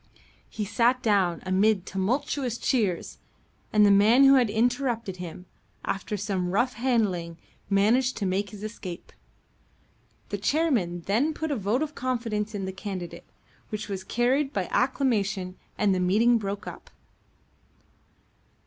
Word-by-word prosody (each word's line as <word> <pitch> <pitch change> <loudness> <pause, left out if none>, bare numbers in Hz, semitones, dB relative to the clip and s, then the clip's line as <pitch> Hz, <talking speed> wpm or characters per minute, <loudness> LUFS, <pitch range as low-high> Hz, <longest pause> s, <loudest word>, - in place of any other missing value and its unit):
He 210 - -4
sat 240 +4 +2
down 190 -6 +2
amid 190 +1 +2
tumultuous 240 +5 -1
cheers, 210 -12 -1 0.5
and 210 -1 +5
the 205 - +6
man 215 +7 +6
who 275 0 +8
had 250 -5 +4
interrupted 235 -2 0
him, 180 0 -8 0.4
after 205 +2 -3
some 195 -3 -2
rough 240 +7 +1
handling, 205 -9 0 0.3
managed 230 +6 +3
to 200 - -2
make 195 +2 -1
his 205 +1 -10
escape. 190 -5 -7 1.2
The 205 - -3
chairman 220 - +1
then 245 - 0
put 315 -1 -3
a - - +1
vote 220 +6 0
of 305 -1 -5
confidence 230 -5 -2
in 195 -2 -3
the 190 - -5
candidate, 190 -3 -7 0.4
which 215 -1 -5
was 190 -2 -4
carried 260 +7 +1
by 195 -7 -1
acclamation, 205 -8 0 0.2
and 205 -2 +2
the 185 - 0
meeting 220 +6 +3
broke 200 -1 -4
up. - - -9
210 Hz, 140 wpm, -26 LUFS, 190-245 Hz, 1.2 s, who